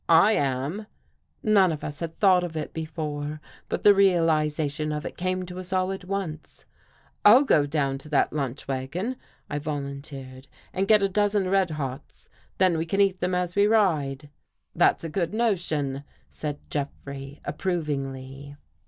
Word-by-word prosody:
" - - -41 0.2
I 215 - +4
am." 145 +5 -1 0.6
None 200 -4 +5
of 155 - -5
us 145 -1 -5
had 165 -1 -5
thought 185 -3 +5
of 165 -2 -4
it 155 - -4
before, 155 -2 -4 0.3
but - - -2
the 205 - +8
realization 155 -5 +2
of 150 +2 -3
it - - -5
came 185 0 -2
to 180 +1 -7
us 185 0 -7
all 185 0 +1
at 190 -1 -6
once. 180 -5 -5 0.3
" - - -35
I'll 240 +7 +8
go 150 - +3
down 140 -2 0
to 150 - -11
that 150 - +2
lunch 140 -3 -3
wagon," 140 - -3 0.3
I 145 - -3
volun 140 -2 -4
^ - - -11
teered, 135 -2 -10
" - - -29
and 195 +1 0
get 210 -1 +5
a - - +4
dozen 205 -1 +1
red 190 -2 +3
hots, 140 -3 -6 0.3
then 185 -3 +3
we 160 - -1
can 195 +4 -1
eat 195 -2 +3
them 180 0 0
as 180 -1 -1
we 205 0 +5
ride." 150 -10 +1 0.2
" - - -50
That's - - +3
a - - -2
good 170 +4 -2
notion," 160 - 0 0.3
said 150 -2 -5
Jeffrey 140 -1 -5
approv 175 +1 -2
ingly. 135 0 -5
160 Hz, 185 wpm, -26 LUFS, 145-190 Hz, 0.6 s, the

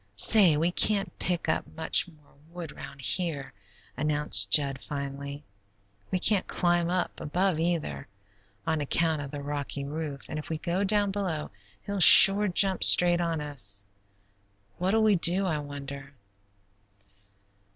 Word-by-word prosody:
Say, 175 - +4
we 165 +3 -1
can't 200 +2 +1
pick 180 -2 -3
up - - -2
much 160 +2 +2
more 155 -4 -22 0.2
wood 170 -2 -9
round 140 - -12
here," 155 -1 -1 0.4
announced 145 -8 +4
Jud, 135 0 +2
finally. 140 0 -8 0.7
"We 185 - -2
can't 195 +1 0
climb 175 -1 -1
up 180 0 -4
above 180 +2 -2
either, 165 - -4 0.6
on 160 -2 -2
account 160 +1 -1
of 140 - -8
the 145 0 -9
rocky 145 -1 -5
roof, 145 -1 -7
and 155 - -6
if 150 - -11
we 160 - -4
go 175 +4 -3
down 205 0 +1
below 185 -6 -5 0.3
he'll 200 -1 -5
sure 195 +3 +8
jump 190 0 0
straight 175 0 +5
on 165 -2 -3
us. 100 -9 -4 0.9
What'll 195 +5 0
we 210 -3 +2
do, 180 +3 0
I 160 -5 -2
wonder?" 140 -1 -10
160 Hz, 140 wpm, -26 LUFS, 145-180 Hz, 0.9 s, sure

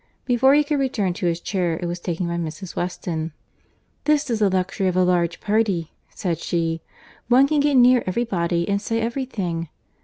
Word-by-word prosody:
Before 265 +2 +4
he 300 - +5
could 295 0 -1
return 230 -9 0
to 180 0 -2
his 170 0 0
chair, 175 -4 -1
it 175 - -4
was 175 +1 -3
taken 175 0 -3
by 170 - -2
Mrs. 170 +2 -5
Weston. 165 -3 -3 0.7
"This 300 -3 +2
is 225 - 0
the 205 -2 +3
luxury 190 +1 0
of 180 - 0
a 185 - +4
large 175 -2 +1
party," 205 -6 0 0.2
said 170 -4 -3
she:—"one 170 +10 0
can 300 0 +1
get 285 0 +2
near 250 -1 +6
every 195 +6 0
body, 170 -5 -1
and 200 0 0
say 225 +2 -1
every 235 +4 -2
thing. 170 - -3
185 Hz, 190 wpm, -22 LUFS, 170-240 Hz, 0.7 s, near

